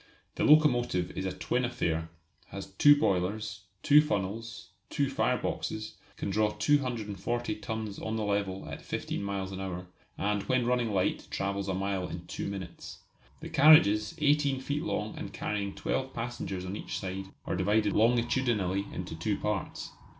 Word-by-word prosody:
The -, -, -2 dB
locomotive 120 Hz, -, +4 dB
is 95 Hz, -, -2 dB
a -, -, -1 dB
twin 125 Hz, -, -1 dB
affair; 80 Hz, -10 st, -1 dB, 0.4 s
has 100 Hz, -, -7 dB
two 145 Hz, +10 st, +6 dB
boilers, 105 Hz, -, -1 dB, 0.2 s
two 150 Hz, +1 st, +7 dB
funnels, 110 Hz, -2 st, -3 dB, 0.2 s
two -, -, 0 dB
fireboxes; 110 Hz, 0 st, -1 dB, 0.3 s
can 100 Hz, -, -3 dB
draw 105 Hz, +2 st, +3 dB
240 120 Hz, -3 st, 0 dB
tons 110 Hz, -2 st, -4 dB
on 110 Hz, 0 st, -3 dB
the 110 Hz, -, -1 dB
level 100 Hz, -2 st, -1 dB
at -, -, -7 dB
fifteen -, -, -3 dB
miles 100 Hz, -1 st, -3 dB
an 95 Hz, 0 st, -5 dB
hour, 90 Hz, -2 st, -4 dB, 0.3 s
and 105 Hz, 0 st, 0 dB
when 130 Hz, -2 st, +3 dB
running 120 Hz, -2 st, +1 dB
light 95 Hz, -2 st, 0 dB
travels 100 Hz, 0 st, -2 dB
a 95 Hz, -, 0 dB
mile 95 Hz, -1 st, -1 dB
in 85 Hz, +1 st, -7 dB
two -, -, -4 dB
minutes. 95 Hz, -3 st, -7 dB, 0.4 s
The -, -, -6 dB
carriages, 110 Hz, -9 st, +6 dB
18 145 Hz, -3 st, +2 dB
feet 145 Hz, +2 st, -2 dB
long 110 Hz, -9 st, -2 dB
and -, -, -6 dB
carrying 100 Hz, -2 st, -3 dB
twelve 130 Hz, 0 st, -2 dB
passengers 115 Hz, -6 st, -4 dB
on 95 Hz, +2 st, -4 dB
each -, -, -4 dB
side, 95 Hz, 0 st, -4 dB, 0.2 s
are -, -, -1 dB
divided 105 Hz, +3 st, +2 dB
longitudinally 115 Hz, -4 st, +2 dB
into 90 Hz, -2 st, -5 dB
two 100 Hz, +6 st, -1 dB
parts. 105 Hz, -3 st, -3 dB
105 Hz, 155 wpm, -30 LUFS, 95-120 Hz, 0.4 s, two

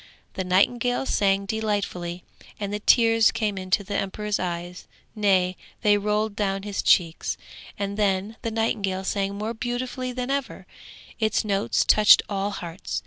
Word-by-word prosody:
The 190 Hz, -, -3 dB
nightingale 240 Hz, +8 st, +2 dB
sang 195 Hz, -4 st, +1 dB
delightfully, 195 Hz, -5 st, -3 dB, 0.4 s
and 205 Hz, -1 st, -3 dB
the 210 Hz, -, -2 dB
tears 225 Hz, 0 st, +4 dB
came 210 Hz, -3 st, -1 dB
into 185 Hz, +1 st, 0 dB
the 205 Hz, +1 st, -6 dB
emperor's 205 Hz, +1 st, -2 dB
eyes, 175 Hz, 0 st, -5 dB, 0.3 s
nay, 190 Hz, -3 st, +2 dB, 0.3 s
they 210 Hz, -1 st, +5 dB
rolled 210 Hz, +1 st, 0 dB
down 195 Hz, -2 st, -1 dB
his 205 Hz, -1 st, -3 dB
cheeks; 165 Hz, -3 st, +2 dB, 0.4 s
and 200 Hz, 0 st, -3 dB
then 200 Hz, +1 st, 0 dB
the 230 Hz, -, -2 dB
nightingale 210 Hz, -4 st, -1 dB
sang 195 Hz, 0 st, -1 dB
more 215 Hz, +2 st, -3 dB
beautifully 250 Hz, +2 st, -3 dB
than 250 Hz, +1 st, -3 dB
ever, 280 Hz, -1 st, -3 dB, 0.5 s
its 215 Hz, -1 st, +1 dB
notes 200 Hz, -1 st, +1 dB
touched 210 Hz, -1 st, +7 dB
all 200 Hz, 0 st, -1 dB
hearts. 170 Hz, -, -5 dB
205 Hz, 145 wpm, -25 LUFS, 190-220 Hz, 0.5 s, touched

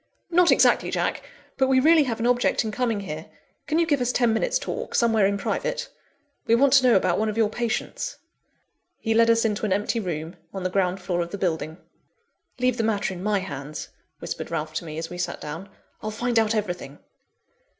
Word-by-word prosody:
"Not 350 Hz, +1 st, +5 dB
exactly, -, -, +4 dB
Jack! -, -, -1 dB, 0.4 s
But 265 Hz, -, +3 dB
we 260 Hz, 0 st, +4 dB
really 310 Hz, +2 st, +5 dB
have 230 Hz, -3 st, -3 dB
an 230 Hz, -, -1 dB
object 245 Hz, 0 st, +2 dB
in 215 Hz, -, -2 dB
coming 230 Hz, -2 st, -1 dB
here. 155 Hz, -4 st, -6 dB, 0.4 s
Can 310 Hz, -, +1 dB
you 335 Hz, -, +4 dB
give 290 Hz, -5 st, +1 dB
us 245 Hz, 0 st, +1 dB
ten 240 Hz, -2 st, +2 dB
minutes' -, -, +1 dB
talk, -, -, -5 dB
somewhere 225 Hz, -4 st, +4 dB
in 200 Hz, 0 st, 0 dB
private? -, -, -2 dB, 0.6 s
We 230 Hz, -, +5 dB
want 265 Hz, +2 st, +4 dB
to 265 Hz, -2 st, +6 dB
know 240 Hz, -, +6 dB
about 185 Hz, -1 st, +2 dB
one 220 Hz, 0 st, +1 dB
of 215 Hz, -, -4 dB
your 220 Hz, -2 st, +3 dB
patients." 240 Hz, -, -3 dB, 0.8 s
He 225 Hz, -, -1 dB
led 230 Hz, +1 st, +5 dB
us 230 Hz, 0 st, +4 dB
into 210 Hz, -1 st, -1 dB
an 210 Hz, -, 0 dB
empty 205 Hz, +4 st, 0 dB
room, 170 Hz, -3 st, -4 dB, 0.2 s
on 190 Hz, -, -4 dB
the 185 Hz, -, -1 dB
ground 185 Hz, -1 st, 0 dB
floor 175 Hz, -2 st, -1 dB
of 170 Hz, -, -3 dB
the 200 Hz, -, -5 dB
building. 160 Hz, -4 st, -2 dB, 0.8 s
"Leave 250 Hz, -1 st, +1 dB
the 225 Hz, -, 0 dB
matter 210 Hz, -3 st, 0 dB
in 180 Hz, -, -8 dB
my 205 Hz, 0 st, +1 dB
hands," 145 Hz, -4 st, -6 dB, 0.3 s
whispered -, -, -5 dB
Ralph 155 Hz, 0 st, -3 dB
to -, -, -5 dB
me, 155 Hz, -1 st, -7 dB
as 165 Hz, +1 st, -5 dB
we 175 Hz, -, -7 dB
sat 180 Hz, -, -3 dB
down. 165 Hz, +7 st, -7 dB, 0.3 s
"I'll 215 Hz, -, -3 dB
find 235 Hz, +2 st, 0 dB
out 220 Hz, 0 st, +1 dB
everything." 180 Hz, -9 st, -3 dB
215 Hz, 210 wpm, -25 LUFS, 180-245 Hz, 0.8 s, to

